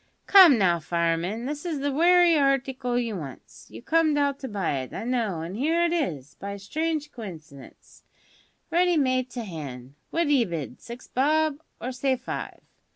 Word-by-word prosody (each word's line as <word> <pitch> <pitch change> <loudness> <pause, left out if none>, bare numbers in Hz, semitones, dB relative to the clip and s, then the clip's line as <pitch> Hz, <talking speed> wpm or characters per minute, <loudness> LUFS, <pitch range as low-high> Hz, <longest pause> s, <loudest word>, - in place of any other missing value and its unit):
"Come 365 - +8
now, 175 -5 +3
fireman, 170 +7 -1
this 295 +2 -4
is 330 -5 -3
the 285 +1 -1
wery 345 +3 +5
harticle 270 -4 +1
you 230 -3 -1
wants. 145 -7 -10
You - - -11
comed 315 0 +2
out 280 -1 +1
to 265 - -5
buy 195 - -2
it, 130 - -7
I - - -4
know, 225 -9 -1
an' 175 +4 -6
'ere 325 +8 +1
it 340 - 0
is, 155 - -2
by 200 0 -5
a - - -7
strange 305 +8 -3
coincidence, 160 - -11 0.7
ready 350 0 +3
made 255 -3 +1
to 240 -1 -5
hand. 140 - -8 0.2
What 335 - +1
d'ye 285 -4 +3
bid? 155 - -6
Six 240 +1 -10
bob? 305 +2 +1 0.2
Or 250 - -4
say 260 +1 0
five. 255 +1 -6
250 Hz, 175 wpm, -26 LUFS, 180-295 Hz, 0.7 s, Come